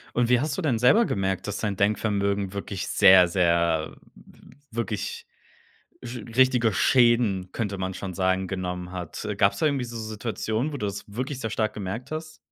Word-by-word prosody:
Und 120 -1 +2
wie 125 -1 +4
hast 150 +3 -2
du 190 - -2
denn 140 -8 +1
selber 170 - +5
gemerkt, 95 - -2
dass 105 - -3
dein 105 -2 -2
Denkvermögen 100 -1 0
wirklich 100 -1 -5
sehr, 95 -3 +7
sehr 85 -3 +1 0.2
w - - -19 0.2
wirklich 110 -2 -4 0.8
Sch 120 +1 -6 0.2
richtige 125 -4 +4
Schäden, 120 -7 +3
könnte 100 -4 -3
man 95 0 -3
schon 95 -1 -6
sagen, 95 +1 0
genommen 90 -1 -4
hat? 90 +2 -6
Äh, 105 - -2
gab's 100 0 +2
da 160 - +2
irgendwie 140 -4 0
so 120 - -8
Situationen, 110 +4 -3
wo - - -4
du 105 -6 -3
das 100 0 -5
wirklich 130 +4 -4
sehr 115 - -3
stark 110 -1 -1
gemerkt 105 +6 -5
hast? 155 0 -6
105 Hz, 180 wpm, -25 LUFS, 95-120 Hz, 0.8 s, sehr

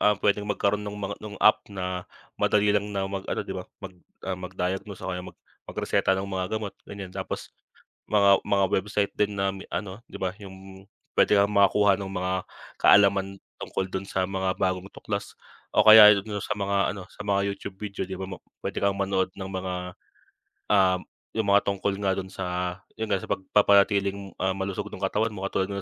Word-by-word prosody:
ah, 105 -1 +4
puwedeng 105 +1 +1
magkaroon 105 0 +1
no'ng 105 - -7
mga 100 -1 -4
no'ng 105 -1 -8
app, 105 0 +5
na 90 -2 -4 0.3
madali 105 0 +3
lang 105 0 +1
na 95 - 0
mag-ano, 95 0 -3
'di - - -5
ba, 95 -1 -7 0.2
mag 95 - -7 0.3
ah, 95 - -2
mag-diagnose 95 +2 -4
o 95 - -2
kaya 90 - -3
mag - - -15 0.3
magreseta 95 - +1
ng 95 - -2
mga 95 -2 -2
gamot, 105 -2 -4 0.2
ganiyan. 100 -2 -8
Tapos, - - -5 0.6
mga 100 -2 +5
mga 100 -1 +2
website 100 +2 0
din 105 0 +1
na 95 0 0
mi 95 - -8
ano, 100 +3 -5
'di - - -8
ba, 95 +1 -2
'yung 95 -1 -12 0.3
puwede 105 - +5
kang 100 +1 +3
makakuha 100 0 +5
no'ng 95 -1 -6
mga 95 0 -1 0.4
kaalaman, 100 -1 +5 0.2
tungkol 95 - -3
do'n 95 +1 -4
sa 95 - 0
mga 95 0 -1
bagong 95 0 -1
tuklas 100 -1 -5 0.4
o - - +6
kaya 110 -1 +10
'yon 100 - -2
do'n 105 -2 -4
sa 105 - -3
mga 100 0 0
ano, 95 - -7
sa - - -10
mga 100 -1 +2
YouTube 100 -1 -8
video, 100 -2 -5
'di 95 - -5
ba, 95 - -6
mo 95 - -7 0.2
puwede - - -3
kang 100 0 +1
manood 95 -1 0
ng 95 0 -6
mga, 95 -1 -3 1.0
um, 95 -3 +4 0.3
'yung 110 -2 -1
mga 100 0 +6
tungkol 100 0 -1
nga 100 -2 +1
do'n 95 0 -4
sa, 90 -1 -3 0.2
'yon 110 -1 -4
nga, 100 - +2
sa - - -7
pagpapanatiling, 100 0 +2
ah, 95 0 0
malusog 95 +1 -3
no'ng - - -8
katawan 105 +3 0
mo, 95 - -7
katulad 95 - 0
nga 100 - -3
100 Hz, 200 wpm, -26 LUFS, 95-100 Hz, 1.0 s, kaya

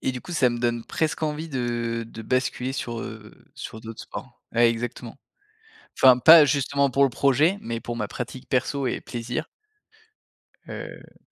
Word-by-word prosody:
et - - 0
du 125 -1 -6
coup, 175 - -8
ça 140 -6 +3
me 120 0 -3
donne 120 -1 0
presque 160 0 -2
envie 155 +1 -2
de 120 -3 -2
de 115 - -9
basculer 130 +1 -1
sur, 120 -3 -4
heu, 110 -1 -9 0.2
sur 110 - -8
d'autres 115 0 -8
sports. 130 -2 -10
Ouais, 120 0 +5
exactement, 115 0 -5 0.8
enfin 130 -2 +7
pas, 160 +4 +9
justement, 140 0 +1
pour 140 +2 +4
le - - +3
projet 145 +9 +3
mais 115 0 -4
pour 120 0 -5
ma 110 -3 -3
pratique 125 +1 -7
perso 135 +1 0
et 125 - -2
plaisir. 120 +5 -5 1.2
Heu - - -9
125 Hz, 170 wpm, -25 LUFS, 115-140 Hz, 1.2 s, pas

